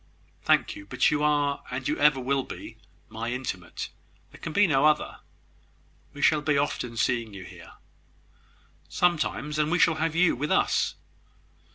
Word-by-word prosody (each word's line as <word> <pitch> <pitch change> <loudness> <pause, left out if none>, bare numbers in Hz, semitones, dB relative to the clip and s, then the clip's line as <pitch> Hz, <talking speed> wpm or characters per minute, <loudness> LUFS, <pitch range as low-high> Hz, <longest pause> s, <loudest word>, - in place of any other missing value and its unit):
"Thank - - +2
you; 100 - -11
but - - +2
you 150 -1 0
are, 145 -1 +1
and 130 +1 -4
ever 150 -2 +3
will 135 +2 0
be, - - -9 0.3
my 115 +2 -5
intimate. 95 -9 -5 0.4
There - - -15
can 160 - -5
be 205 +6 +4
no 140 -6 +2
other. 155 -1 +1 0.9
We 145 0 -7
shall 155 -2 +4
be 150 -1 +1
often 125 -4 -2
seeing 115 -3 0
you 95 - -8
here." - - -13 1.2
"Sometimes; 150 -3 0
and 150 0 +2
we 175 - +3
shall 160 -3 +3
have 165 0 0
you 180 0 +4
with 150 +5 -3
us." - - +2
145 Hz, 160 wpm, -26 LUFS, 125-155 Hz, 1.2 s, be